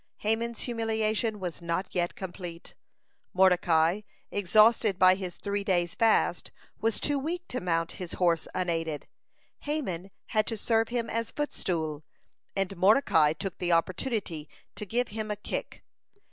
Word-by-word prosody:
Haman's 225 +2 -1
humiliation 220 -2 0
was 180 -2 -4
not 170 +3 -2
yet 175 -1 0
complete. 175 -2 -7 0.6
Mordecai, 180 -1 +4 0.3
exhausted 215 +1 +4
by 185 0 +7
his 185 -2 -5
three 200 0 -2
days' 175 -4 +1
fast, 225 -1 +2 0.3
was 225 0 0
too 290 -1 +1
weak 345 +5 -4
to 250 - -2
mount 165 -2 0
his 180 - -5
horse 170 -3 +1
unaided. 165 -4 -1 0.5
Haman 200 - -3 0.2
had 215 -1 +2
to 225 - -2
serve 225 +1 +2
him 235 -1 -2
as 230 0 -2
footstool, 160 - -2 0.5
and 195 0 -1
Mordecai 185 - +5
took 185 +3 -6
the 175 -1 +1
opportunity 170 - -1 0.2
to 210 - -7
give 245 +4 0
him 215 0 -4
a 210 - -1
kick. 210 - -5
195 Hz, 140 wpm, -29 LUFS, 175-225 Hz, 0.6 s, by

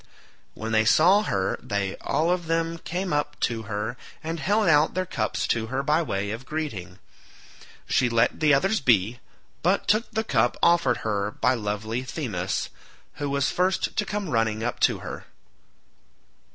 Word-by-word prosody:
When 110 0 -5
they 110 0 +4
saw 175 - +5
her 95 - -1
they 100 -1 -2
all 165 +3 0
of 175 -2 -1
them 165 0 -1
came 180 +2 -3
up 145 0 -1
to 115 -1 0
her, 110 +4 -3 0.3
and 165 +1 -3
held 205 +6 +2
out 150 0 +4
their 185 0 0
cups 110 -10 -2
to 110 -1 0
her 130 +3 -2
by 150 +3 +2
way 100 -9 -2
of 115 +4 -5
greeting. 110 - -5 0.9
She 125 - +2
let 115 0 +2
the 155 -1 +4
others 195 +10 +3
be, 120 -2 +2 0.4
but 185 +4 +1
took 215 +3 +2
the 220 - -1
cup 120 - +1
offered 170 -8 +4
her 100 -2 0
by 125 +4 +1
lovely 110 +1 -3
Themis, 120 - -3 0.5
who 145 -1 -2
was 140 0 +1
first 185 +1 0
to 210 - +1
come 205 -3 -3
running 115 -2 +1
up 120 - -2
to - - +2
her. - - -7
135 Hz, 165 wpm, -25 LUFS, 110-165 Hz, 0.9 s, saw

